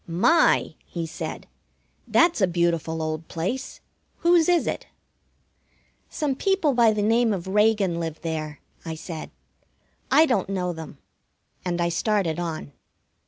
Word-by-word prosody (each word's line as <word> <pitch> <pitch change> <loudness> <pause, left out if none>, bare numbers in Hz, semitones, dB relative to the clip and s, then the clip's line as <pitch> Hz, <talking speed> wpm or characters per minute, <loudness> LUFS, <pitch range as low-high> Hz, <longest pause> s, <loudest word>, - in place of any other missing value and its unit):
"My!" 215 - +3
he 170 -2 -4
said, 160 - -6 0.6
"that's 340 -9 +3
a 190 - +5
beautiful 170 -2 0
old 155 +1 -4
place! 195 +11 -4 0.4
Whose 340 -1 +4
is 350 -1 +3
it?" - - -3 1.2
"Some 300 -4 -1
people 360 -1 +1
by 235 -2 +5
the 210 -1 -1
name 230 +2 +3
of 190 -4 -3
Reagan 205 -3 +2
live 165 -2 -4
there," 155 -3 -4 0.2
I 165 -1 -5
said. 160 0 -7 0.8
"I 315 - +6
don't 220 - 0
know 180 -2 -1
them." 160 -3 -9 0.7
And 175 -1 -2
I 170 0 +1
started 175 -2 0
on. 160 -4 -4
180 Hz, 135 wpm, -24 LUFS, 165-235 Hz, 1.2 s, I